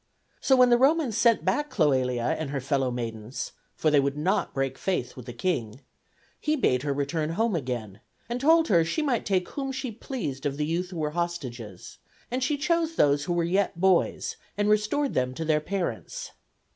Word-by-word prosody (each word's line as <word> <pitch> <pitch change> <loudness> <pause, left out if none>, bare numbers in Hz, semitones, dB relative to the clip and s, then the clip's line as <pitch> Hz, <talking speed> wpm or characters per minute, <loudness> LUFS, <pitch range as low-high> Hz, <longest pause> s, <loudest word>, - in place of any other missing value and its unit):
So 265 - +4
when 250 -1 +6
the 240 - +5
Romans 275 -3 +3
sent 230 -7 +3
back 265 +11 +1
Cloelia 130 - +1
and 155 -3 -3
her 140 0 -2
fellow 135 -1 0
maidens 115 -1 -5 0.2
for 155 - +1
they 145 - +5
would 140 +1 0
not 185 +7 0
break 135 -1 -2
faith 180 -10 -2
with 125 -1 -10
the - - -5
king 120 -3 -2 0.6
he 305 0 +1
bade 125 - +2
her 145 +1 -1
return 150 +3 -1
home 225 +2 +1
again, 120 - -4 0.3
and 240 +1 -3
told 325 +3 +5
her 170 -5 +5
she 235 - -1
might 260 -6 0
take 185 -2 +1
whom 270 -1 -3
she 260 -2 -4
pleased 155 - -4
of 140 0 -3
the 150 - 0
youths 170 +3 -1
who 180 - -7
were 150 -2 -1
hostages; 130 - -5 0.3
and 255 +1 -1
she 295 +2 +1
chose 330 +2 0
those 145 - +3
who 175 - -1
were 170 -1 +1
yet 180 0 0
boys, 190 -1 +2 0.2
and 205 0 +1
restored 215 +7 +1
them 130 0 0
to 160 - -3
their 155 -1 +2
parents. 200 - -4
170 Hz, 195 wpm, -27 LUFS, -, 0.6 s, when